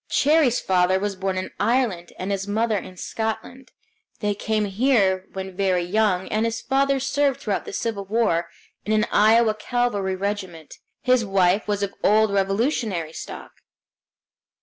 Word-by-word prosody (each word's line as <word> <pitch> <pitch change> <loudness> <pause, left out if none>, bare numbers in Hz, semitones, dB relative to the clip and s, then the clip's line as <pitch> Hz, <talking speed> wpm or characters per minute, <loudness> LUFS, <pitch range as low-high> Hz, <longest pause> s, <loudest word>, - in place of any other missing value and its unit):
Cherrie's 290 -4 +3
father 185 0 +2
was 205 0 -2
born 190 0 -2
in 185 - -4
Ireland, 220 -7 0
and 185 +2 -4
his 195 0 -2
mother 220 +2 0
in 185 -2 -6
Scotland; 225 +6 -5 0.5
they 205 -1 0
came 215 +1 -1
here 195 -3 +2
when 190 -1 -6
very 185 -2 +1
young, 190 0 +1
and 215 +1 0
his 230 0 -1
father 275 0 +1
served 275 0 0
throughout 205 -3 -2
the - - -7
Civil 215 -4 -3
War 190 -6 0 0.3
in 215 - -1
an 215 0 +3
Iowa 220 +1 +4
cavalry 215 -3 -1
regiment. 190 -5 -5 0.2
His 255 -2 +3
wife 195 0 +2
was 205 -1 -1
of 200 0 -3
old 215 0 +4
Revolutionary 195 - 0
stock. - - -8
205 Hz, 150 wpm, -23 LUFS, 190-230 Hz, 0.5 s, Iowa